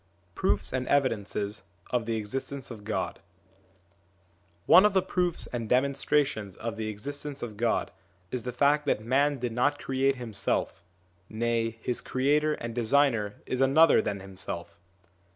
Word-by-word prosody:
II 90 Hz, -1 st, -38 dB
PROOFS -, -, 0 dB
AND 130 Hz, -1 st, -1 dB
EVIDENCES 110 Hz, -6 st, 0 dB, 0.3 s
OF 120 Hz, -2 st, 0 dB
THE 115 Hz, -, 0 dB
EXISTENCE 130 Hz, +5 st, -4 dB
OF 110 Hz, -3 st, -9 dB
GOD 95 Hz, -5 st, -3 dB, 1.5 s
ONE 185 Hz, -, +8 dB
of 210 Hz, -1 st, +4 dB
the 190 Hz, -, +4 dB
proofs 180 Hz, -2 st, -1 dB
and 115 Hz, -3 st, -3 dB
demonstrations 135 Hz, -5 st, +1 dB
of 115 Hz, 0 st, -5 dB
the 110 Hz, -1 st, -4 dB
existence 140 Hz, +7 st, -5 dB
of 110 Hz, -3 st, -6 dB
God, 115 Hz, +2 st, 0 dB, 0.4 s
is 125 Hz, -, -2 dB
the 125 Hz, -, -4 dB
fact 145 Hz, +4 st, +2 dB
that 110 Hz, -, 0 dB
man 140 Hz, +4 st, +2 dB
did 120 Hz, -1 st, -3 dB
not 145 Hz, +5 st, +1 dB
create 135 Hz, 0 st, +1 dB
himself: 110 Hz, -8 st, -2 dB, 0.5 s
nay, 115 Hz, 0 st, -1 dB
his 125 Hz, -, -1 dB
creator 150 Hz, +4 st, +1 dB
and 115 Hz, 0 st, -6 dB
designer 115 Hz, -3 st, +2 dB
is 130 Hz, -, -2 dB
another 145 Hz, +4 st, +6 dB
than 100 Hz, -1 st, -3 dB
himself. 95 Hz, -2 st, -7 dB
120 Hz, 150 wpm, -28 LUFS, 110-140 Hz, 1.5 s, ONE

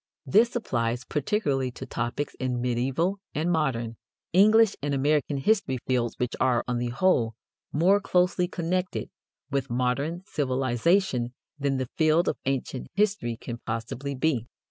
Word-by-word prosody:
This 225 Hz, -, +4 dB
applies 120 Hz, -, -1 dB
particularly 140 Hz, -, 0 dB
to -, -, -7 dB
topics 120 Hz, +5 st, -3 dB
in 125 Hz, -1 st, -1 dB
medieval 130 Hz, +10 st, 0 dB, 0.2 s
and 160 Hz, +4 st, +1 dB
modern, 120 Hz, -8 st, 0 dB, 0.4 s
English 215 Hz, +3 st, +6 dB
and 145 Hz, 0 st, -1 dB
American 145 Hz, +1 st, +1 dB
history 135 Hz, -3 st, +1 dB
fields 125 Hz, -2 st, 0 dB
which 125 Hz, -1 st, -2 dB
are, 125 Hz, -2 st, +2 dB
on 125 Hz, -1 st, 0 dB
the 120 Hz, 0 st, -1 dB
whole, 120 Hz, -5 st, +2 dB, 0.4 s
more 185 Hz, +7 st, +4 dB
closely 180 Hz, -2 st, +2 dB
connected 180 Hz, +1 st, -2 dB, 0.4 s
with 135 Hz, -1 st, -1 dB
modern 130 Hz, +8 st, -1 dB
civilization 130 Hz, -, +1 dB, 0.2 s
than 140 Hz, -1 st, 0 dB
the 130 Hz, -2 st, -3 dB
field 160 Hz, +2 st, +4 dB
of -, -, -1 dB
ancient 135 Hz, -1 st, -2 dB
history 200 Hz, -, +1 dB
can 120 Hz, 0 st, -7 dB
possibly 115 Hz, +6 st, -4 dB
be. 130 Hz, -4 st, 0 dB
135 Hz, 140 wpm, -27 LUFS, 125-175 Hz, 0.4 s, English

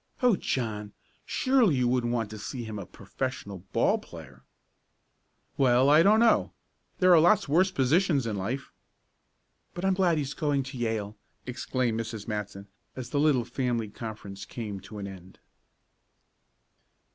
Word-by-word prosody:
"Oh, 245 Hz, -4 st, +5 dB
John! 105 Hz, -, -3 dB, 0.3 s
surely 255 Hz, -, +3 dB
you 125 Hz, -1 st, +1 dB
wouldn't 120 Hz, -1 st, +1 dB
want 115 Hz, -3 st, -1 dB
to 110 Hz, -, -7 dB
see 120 Hz, +4 st, -5 dB
him 110 Hz, -2 st, -6 dB
a 95 Hz, -, -8 dB
professional 100 Hz, -2 st, -5 dB
ball -, -, +2 dB
player?" 65 Hz, 0 st, -13 dB, 1.1 s
"Well, 130 Hz, +1 st, +4 dB
I 155 Hz, +2 st, +7 dB
don't 210 Hz, +5 st, +5 dB
know. 230 Hz, -1 st, +3 dB, 0.4 s
There 185 Hz, -1 st, +5 dB
are 170 Hz, -, +8 dB
lots 175 Hz, +4 st, +4 dB
worse 175 Hz, +7 st, +3 dB
positions 150 Hz, -2 st, +2 dB
in 110 Hz, -2 st, -2 dB
life." 115 Hz, +9 st, -4 dB, 1.0 s
"But 175 Hz, +2 st, -3 dB
I'm 190 Hz, -, +3 dB
glad 180 Hz, -3 st, +2 dB
he's 145 Hz, -1 st, -2 dB
going 145 Hz, -2 st, 0 dB
to 135 Hz, 0 st, -8 dB
Yale!" 110 Hz, -3 st, -2 dB, 0.3 s
exclaimed 125 Hz, -1 st, -2 dB
Mrs. 110 Hz, -2 st, -5 dB
Matson, 105 Hz, -2 st, -5 dB, 0.3 s
as 130 Hz, -2 st, -7 dB
the 145 Hz, -, +1 dB
little 145 Hz, -5 st, +3 dB
family 120 Hz, -5 st, -2 dB
conference 105 Hz, -3 st, -8 dB
came 105 Hz, -2 st, -6 dB
to 100 Hz, +3 st, -11 dB
an 100 Hz, -, -5 dB
end. 95 Hz, -1 st, -11 dB
125 Hz, 150 wpm, -28 LUFS, 105-150 Hz, 1.1 s, are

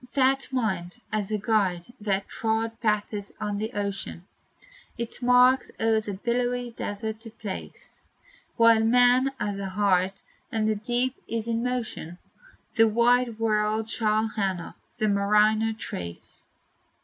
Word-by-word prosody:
That 270 Hz, 0 st, +3 dB
mind, 205 Hz, -6 st, -2 dB
as 215 Hz, -2 st, -1 dB
a 215 Hz, -, 0 dB
guide 200 Hz, -2 st, 0 dB
that 200 Hz, -2 st, -1 dB
trod 225 Hz, 0 st, -2 dB
paths 210 Hz, -2 st, -1 dB
on 205 Hz, -1 st, -2 dB
the 220 Hz, +2 st, -3 dB
ocean 200 Hz, -4 st, -3 dB, 0.7 s
Its 235 Hz, +1 st, -5 dB
marks 250 Hz, +1 st, +5 dB
o'er 225 Hz, -1 st, +3 dB
the 210 Hz, -1 st, -5 dB
billowy 245 Hz, +3 st, -1 dB
desert 220 Hz, 0 st, -4 dB
to 225 Hz, 0 st, -8 dB
place, 215 Hz, -3 st, -8 dB, 0.5 s
While 230 Hz, -1 st, +6 dB
man 245 Hz, +3 st, +4 dB
has 205 Hz, -1 st, -2 dB
a 195 Hz, -1 st, -3 dB
heart, 190 Hz, -1 st, +1 dB, 0.3 s
and 220 Hz, -1 st, 0 dB
the 220 Hz, -, +3 dB
deep 240 Hz, +4 st, 0 dB
is 230 Hz, 0 st, -3 dB
in 230 Hz, 0 st, 0 dB
motion, 240 Hz, -9 st, -3 dB, 0.6 s
The 225 Hz, 0 st, +7 dB
wide 235 Hz, +1 st, +3 dB
world 215 Hz, 0 st, +1 dB
shall 215 Hz, 0 st, +1 dB
honor, 190 Hz, -5 st, -2 dB, 0.2 s
the 215 Hz, -, +1 dB
mariner 210 Hz, +2 st, +3 dB
trace. 85 Hz, -, -7 dB
220 Hz, 135 wpm, -26 LUFS, 205-235 Hz, 0.7 s, The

